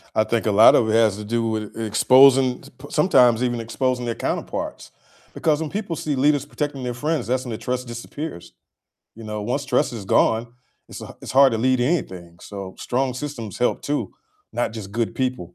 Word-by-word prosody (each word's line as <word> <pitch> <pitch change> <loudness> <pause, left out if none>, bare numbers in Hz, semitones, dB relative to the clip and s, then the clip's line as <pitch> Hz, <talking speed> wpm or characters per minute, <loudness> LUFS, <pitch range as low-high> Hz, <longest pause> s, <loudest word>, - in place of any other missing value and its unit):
I 110 - +4
think 115 0 -1
a 105 - +2
lotta 110 +2 +6
it 110 - 0
has 110 -3 +3
to 105 - -7
do 115 +2 -1
with 110 -1 -4
e 115 - -3
exposing 130 +3 +5
p 140 - -15 0.2
sometimes 125 -8 +4
even 120 -1 -1
exposing 125 +2 -2
their 115 -1 -2
counterparts, - - -4 0.4
because 155 -1 0
when 160 - -3
people 195 -2 -4
see 150 -2 -2
leaders 145 +1 +2
protecting 145 -2 -4
their 125 -1 -3
friends, 150 +4 -2
that's 130 +1 -1
when 120 - -5
the 110 - -4
trust 125 +1 -4
disappears. 120 - -7 0.6
You 115 - -11
know, 105 -1 -5
once 125 +6 -2
trust 125 -2 +1
is 110 -4 -7
gone, 115 +4 +1 0.4
it's - - -9
h - - -9
it's - - -6
hard 135 -1 +6
to 110 - -1
lead 130 +2 +2
anything, 95 - -2
so 100 -2 -8
strong 130 0 -1
systems 130 -6 -6
help 125 - 0
too, 145 0 -2 0.4
not 120 -2 -2
just 105 -3 -8
good 115 0 -2
people. 125 -10 -3
125 Hz, 200 wpm, -22 LUFS, 110-135 Hz, 0.6 s, lotta